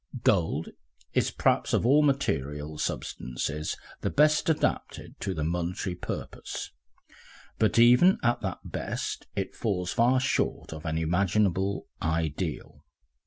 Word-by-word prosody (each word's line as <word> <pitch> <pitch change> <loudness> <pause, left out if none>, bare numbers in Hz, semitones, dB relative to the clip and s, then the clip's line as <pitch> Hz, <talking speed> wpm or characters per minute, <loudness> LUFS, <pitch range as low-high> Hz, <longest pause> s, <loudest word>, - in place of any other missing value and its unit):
Gold 80 -2 +2 0.4
is - - +2
perhaps - - +1
of - - +2
all 140 +5 +6
material 75 - -1
substances 75 +6 -3 0.2
the - - 0
best 155 +4 +3
adapted 160 - -1
to 95 -2 -3
the 75 - -2
monetary 90 +3 -2
purpose, 90 - -6 0.9
but 110 - +2
even 125 +11 +7
at 120 0 +2
that 95 -3 -4
best - - -4
it 95 -1 -2
falls 90 -5 -2
far 125 +2 +4
short 130 -9 -1
of 80 +1 -7
an 80 0 -1
imaginable 95 +3 +1 0.2
ideal. 80 0 -2
90 Hz, 120 wpm, -28 LUFS, 80-120 Hz, 0.9 s, even